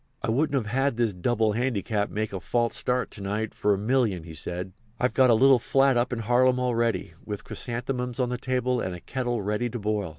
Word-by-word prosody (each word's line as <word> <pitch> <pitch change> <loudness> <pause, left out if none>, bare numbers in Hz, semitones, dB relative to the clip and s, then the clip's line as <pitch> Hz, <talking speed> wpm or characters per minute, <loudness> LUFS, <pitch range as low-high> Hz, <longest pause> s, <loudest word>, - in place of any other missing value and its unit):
"I - - 0
wouldn't 140 -1 +1
have 135 +4 0
this 115 -3 +1
double 110 +4 +1
handicap 110 -3 -1
make 110 0 -3
a 95 - -3
false 120 +4 0
start 125 0 -1
to - - -10
night 105 +3 -2
for 105 - +1
a 100 - +3
million," 110 -5 +1
he 80 -1 -10
said. 90 +3 -5 0.3
"I've 125 - +1
got 130 -1 +5
a 115 - +6
little 135 +2 +6
flat 135 +2 +3
up 120 +1 +1
in 125 - -2
Harlem 125 +3 +3
all 125 -1 0
ready, 115 0 0
with 105 -2 -6
chrysanthemums 125 0 -4
on 125 -1 +1
the 125 -1 -3
table 125 -1 0
and 95 - -3
a - - -8
kettle 120 0 -3
ready 105 +4 -1
to 120 - -5
boil. 105 -3 -1
120 Hz, 225 wpm, -26 LUFS, 105-125 Hz, 0.3 s, a